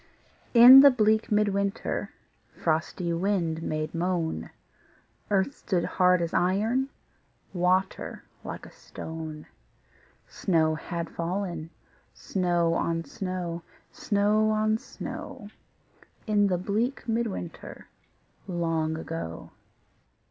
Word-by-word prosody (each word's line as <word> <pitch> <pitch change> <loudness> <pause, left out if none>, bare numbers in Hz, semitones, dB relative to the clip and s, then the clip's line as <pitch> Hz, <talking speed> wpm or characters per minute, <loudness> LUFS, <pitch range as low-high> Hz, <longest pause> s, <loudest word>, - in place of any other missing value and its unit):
In 245 +3 +11
the 280 +1 +9
bleak 220 -2 +2
mid 210 0 +3
winter 200 0 -2 0.4
Frosty 170 +2 -1
wind 170 -3 0
made 155 -1 -3
moan, 170 -1 -2 0.8
Earth 200 +6 +1
stood 180 -4 -1
hard 180 -1 +3
as 165 - -4
iron, 220 +9 +1 0.6
Water 185 +1 0 0.2
like - - -7
a - - -13
stone; 160 -1 -8 0.8
Snow 160 -4 +1
had 170 +1 -4
fallen, 170 -2 -3 0.5
snow 175 -3 0
on 165 0 -1
snow, 180 -2 -4 0.3
Snow 210 +1 +1
on 215 0 +1
snow, 205 - -8 0.8
In 205 -2 +3
the 180 -2 +1
bleak 215 +10 -2
mid 230 +1 0
winter 175 -4 -7 0.6
Long 165 -3 -1
ago. 160 - -6
180 Hz, 100 wpm, -27 LUFS, 165-210 Hz, 0.8 s, In